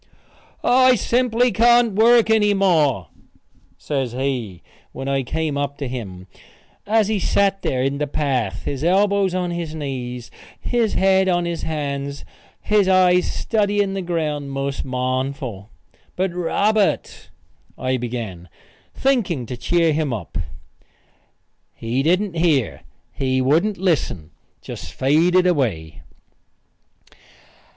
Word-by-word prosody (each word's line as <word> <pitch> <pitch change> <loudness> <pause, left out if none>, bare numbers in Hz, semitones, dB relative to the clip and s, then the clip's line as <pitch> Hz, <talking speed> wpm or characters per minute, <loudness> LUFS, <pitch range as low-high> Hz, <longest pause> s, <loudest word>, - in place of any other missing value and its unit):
"I 255 +1 +5
simply 245 +1 +1
can't 235 -1 +4
work 225 +2 +5
any 210 -2 +3
more," 155 - +2 0.7
says 135 -5 -3
he, 125 -9 -3 0.3
when 135 - -6
I 135 0 +1
came 150 +2 -2
up 140 0 -3
to 140 - -4
him, 100 -8 -7 0.6
as 215 -1 +3
he 215 -1 0
sat 195 +1 +1
there 130 -1 -1
in 135 +1 -1
the 150 - -1
path, 130 -9 -2
his 140 0 -4
elbows 195 +1 +2
on 180 -1 -1
his 170 -2 -4
knees, 125 -5 -5 0.3
his 235 -3 0
head 190 0 +3
on 175 -1 +1
his 170 -1 -3
hands, 140 -2 -4 0.4
his 210 -2 +2
eyes 180 -1 +4
studying 205 -2 0
the 195 - -3
ground 155 -5 -2
most 135 0 -3
mournful. 130 -4 -3 0.5
"But 185 -1 -1
Robert 200 +4 0 0.2
" - - -36
I 130 0 -1
began, 115 -8 -6 0.5
thinking 220 - 0
to 125 - -6
cheer 165 +6 +1
him 150 -2 -1
up. 105 -8 -6 1.4
He 115 +4 -2
didn't 180 +5 +1
hear; 160 -8 +1 0.3
he 130 -1 -1
wouldn't 160 +11 +2
listen 140 - -1 0.3
just - - -8
faded 170 +7 +3
away. 110 - -1
155 Hz, 125 wpm, -21 LUFS, 130-195 Hz, 1.4 s, I